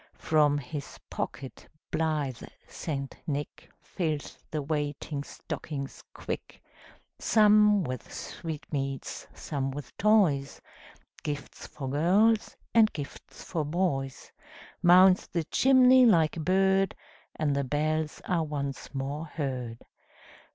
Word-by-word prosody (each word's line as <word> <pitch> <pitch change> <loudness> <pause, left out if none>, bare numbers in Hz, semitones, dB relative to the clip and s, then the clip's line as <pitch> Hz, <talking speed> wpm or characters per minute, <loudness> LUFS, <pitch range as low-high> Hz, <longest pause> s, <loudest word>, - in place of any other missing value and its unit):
From 150 -2 +3
his 140 +1 -6
pocket 135 - -5 0.2
blithe 150 -6 -1 0.3
St. 140 -4 -5
Nick 145 -1 -4
Fills 155 -5 -3
the 150 -2 -3
waiting 145 -1 -3
stockings 140 -1 -6
quick; - - -6 0.6
Some 210 -2 +5
with 130 -4 -5
sweetmeats, 140 -4 -5
some 135 -3 -3
with 135 -1 -8
toys, 180 -10 +3 0.6
Gifts 145 -2 -6
for 135 - -7
girls, 195 +11 +3 0.2
and 220 -2 +6
gifts 145 -2 -8
for 165 -4 -2
boys, 145 -5 -2 0.5
Mounts 185 +1 +6
the 170 -2 -1
chimney 255 - +6
like 165 -8 +4
a - - -5
bird, 190 +3 +2 0.4
And 145 -3 0
the 140 - +1
bells 155 +3 -1
are 175 -3 +1
once 140 -2 -5
more 140 +4 -3
heard. 130 -7 -4
150 Hz, 110 wpm, -28 LUFS, 140-180 Hz, 0.6 s, and